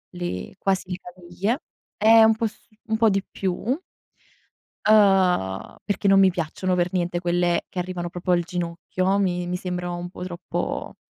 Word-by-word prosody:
le 175 - -4
quasi 190 -1 -1
le 180 - -2
caviglie. 180 - -3 0.4
È 225 +1 +7
un 220 0 +5
po' 225 +1 0
su 220 +2 -15 0.2
un 220 - 0
po' 225 0 +5
di 195 -1 +1
più. 190 -2 -2 1.3
Uhm, 190 - +3
perché 200 0 0
non 195 0 +6
mi 190 -1 +6
piacciono 180 +1 -2
per 175 0 0
niente 175 -1 -1
quelle 175 0 +1
che 185 - -5
arrivano 175 -1 -3
proprio 180 +1 -1
al 175 - +3
ginocchio, 180 +2 -1
mi 180 -3 0
mi 180 - -2
sembra 180 -1 -3
un 175 0 -5
po' 180 - -8
troppo, 175 -1 -4
180 Hz, 170 wpm, -24 LUFS, 175-195 Hz, 1.3 s, È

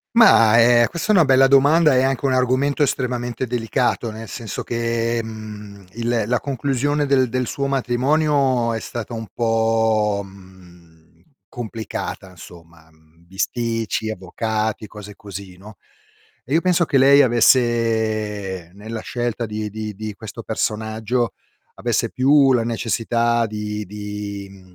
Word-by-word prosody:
Ma, 115 - +6
eh, 120 0 +5
questo 170 +5 -1
è - - +3
una 170 -5 +5
bella 135 0 +5
domanda 145 +3 +5
e 130 - +3
anche 135 0 -1
un 135 - +2
argomento 130 +3 +1
estremamente 125 -2 -1
delicato, 120 0 -1
nel 110 +1 -8
senso 110 -3 -6
che, 115 0 -1
mhmm, 105 -3 -9
il 115 0 -1
la 125 +1 0
conclusione 140 +2 -1
del 135 -2 +2
del 130 +1 -2
suo 140 +3 -2
matrimonio 135 -1 +1
è 115 - -3
stata 120 +1 -6
un 115 -1 -5
po', 110 -2 +1
mhmm, 90 -4 -18 0.3
complicata 110 -5 -6
insomma. 85 -2 -15
Mhmm, 80 +2 -27
bisticci, 115 +3 -2
avvocati, 110 +2 -3
cose 105 0 -11
così, 100 -2 -10
no; 105 +2 -13 0.7
e 135 - -3
io 165 - +4
penso 180 -2 +3
che 140 - 0
lei 140 +2 +6
avesse 110 -6 +1
nella 110 +3 -7
scelta 120 -1 -3
di 105 0 -4
di 110 0 -6
di 110 +1 -6
questo 110 +3 -9
personaggio, 110 +1 -2 0.4
avesse - - -1
più 135 +1 +4
la 115 -2 +1
necessità 115 0 0
di 105 0 -5
di, 105 0 -7
mhmm, 95 -2 -17
115 Hz, 140 wpm, -21 LUFS, 105-125 Hz, 0.7 s, Ma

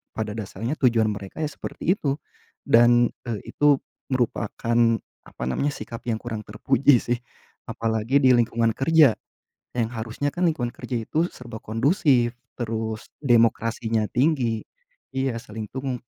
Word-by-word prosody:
pada 110 -2 -2
dasarnya 110 +6 -4
tujuan 115 -4 +3
mereka 100 +9 -6
ya 150 - 0
seperti - - -3
itu. 140 -1 0 0.5
Dan, 120 +1 +5 0.2
eee, 110 -4 -4
itu 145 -1 +4 0.3
merupakan 120 -2 -1 0.5
apa - - -8
namanya, 65 - 0
sikap 115 - -7
yang 115 - +1
kurang 110 -2 -6
terpuji 135 +6 +3
sih, 120 0 -1 0.5
apalagi 115 +5 0
di 130 - +7
lingkungan 115 -1 +3
kerja, 150 0 +4 0.6
yang 115 -1 +1
harusnya 115 +6 -3
kan 175 -1 +2
lingkungan 120 -6 -2
kerja 125 - -4
itu 165 +3 0
serba 120 -3 -10
kondusif, 120 - +2 0.2
terus 110 -2 -3 0.2
demokrasinya 115 -3 +2
tinggi. 125 -5 +1 0.5
Iya 130 -3 -1
saling 110 -2 -7
dung 130 -2 -4
120 Hz, 135 wpm, -24 LUFS, 110-135 Hz, 0.6 s, di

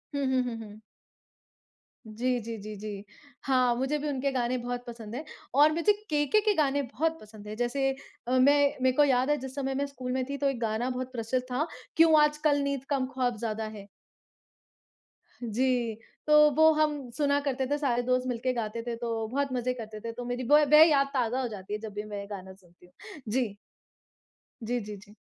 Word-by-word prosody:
हुँ, 280 -1 0 0.2
हुँ, 245 -2 -3
हुँ। 215 -1 -10 1.2
जी, 245 +3 -1
जी, 225 0 -6
जी, 215 +1 -7
जी। 205 -1 -6 0.4
हाँ, 255 -2 +3
मुझे 265 +4 0
भी 300 +1 -4
उनके 275 0 -1
गाने 250 -1 0
बहुत 245 0 -4
पसंद 230 -2 -8
हैं 285 - -4 0.3
और 295 +2 +6
मुझे 335 +6 +3 0.2
केके 295 +8 +2
के 420 0 +2
गाने 285 -3 +2
बहुत 320 +5 -2
पसंद 210 -1 -13
हैं। 210 - -5
जैसे 270 +3 0 0.4
अ, - - -2
मैं 285 +2 +4
मैं 260 0 +4
को 295 - +6
याद 260 -1 +2
है 295 - +3
जिस 265 -1 -8
समय 270 -1 -2
मैं 280 +1 0
स्कूल 260 -3 -6
में 260 0 0
थी 280 - -3
तो 280 0 +1
एक 265 -3 -3
गाना 225 +2 -1
बहुत 255 0 -4
प्रचलित 250 +1 -2
था, 285 +6 0 0.3
क्यों 320 -1 +6
आजकल 300 -1 +2
नींद 280 -2 -2
कम 275 -3 +1
ख़्वाब 250 -3 0
ज़्यादा 220 0 -3
है। 200 -1 -11 1.6
जी, 240 0 0 0.3
तो 300 0 +7
वो 315 +1 +7
हम 300 -4 0
सुना 285 -1 +2
करते 270 -2 -1
थे, 290 +2 0
सारे 255 -5 +1
दोस्त 255 +1 +1
मिलके 250 +1 -1
गाते 230 -1 -3
थे 235 - -2
तो 230 -1 -3
बहुत 275 +3 -1
मज़े 250 0 0
करते 220 -3 -8
थे। 230 - -3
तो 245 +1 -7
मेरी 245 +1 -3
ब 300 0 +7
वह 305 +1 +10
याद 275 -2 +3
ताज़ा 250 0 0
हो 250 - -1
जाती 205 -3 -7
है 210 - -2
जब 215 -1 -8
भी 205 +1 -4
मैं 210 -1 -6
ये 200 - -6
गाना 190 -2 -8
सुनती 180 -2 -22
हूँ। 180 - -14
जी। 235 -4 0 1.1
जी, 245 +2 -1
जी, 210 0 -7
जी। 205 +1 -17
255 Hz, 205 wpm, -28 LUFS, 225-280 Hz, 1.6 s, वह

